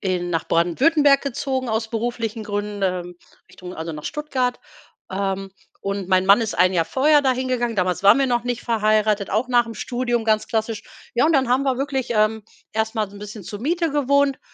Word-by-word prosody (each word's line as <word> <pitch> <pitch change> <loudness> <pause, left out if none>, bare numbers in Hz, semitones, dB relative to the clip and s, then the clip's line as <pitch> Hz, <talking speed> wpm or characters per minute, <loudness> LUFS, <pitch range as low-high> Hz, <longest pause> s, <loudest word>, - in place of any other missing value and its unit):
in 180 -3 -1
nach 165 -1 -1
Baden-Württemberg 275 - +3
gezogen 265 -1 -2
aus 220 0 -1
beruflichen 230 -1 -3
Gründen, 205 -1 -4
ähm, 180 -2 -2 0.3
Richtung 180 0 -10
also 160 0 -5
nach 150 -1 -8
Stuttgart. 260 -5 -2 0.5
Ähm, 195 0 -2 0.3
und 195 -1 -4
mein 185 0 +3
Mann 200 +3 +6
ist 220 - -3
1 185 +1 +4
Jahr 165 -2 +2
vorher 290 - +3
dahin 260 -1 0
gegangen. 240 -3 -1
Damals 185 0 0
waren 200 +7 +7
wir 275 - +2
noch 240 -2 0
nicht 245 -1 -3
verheiratet, 215 -2 +1
auch 220 +6 0
nachm 240 -2 +2
Studium 240 0 -2
ganz 215 -1 +1
klassisch. 220 -2 -2 0.3
Ja, 240 - +3
und 325 - +3
dann 265 -4 +2
haben 255 +2 +2
wir 265 -2 0
wirklich, 270 -2 -2
ähm, 215 0 +1 0.3
erst 220 +1 -1
mal 215 -3 -1
so 205 - -13
'n - - -10
bisschen 210 0 -8
zur 205 +2 -7
Miete 330 +5 0
gewohnt 280 -1 +2
225 Hz, 200 wpm, -22 LUFS, 200-255 Hz, 0.5 s, waren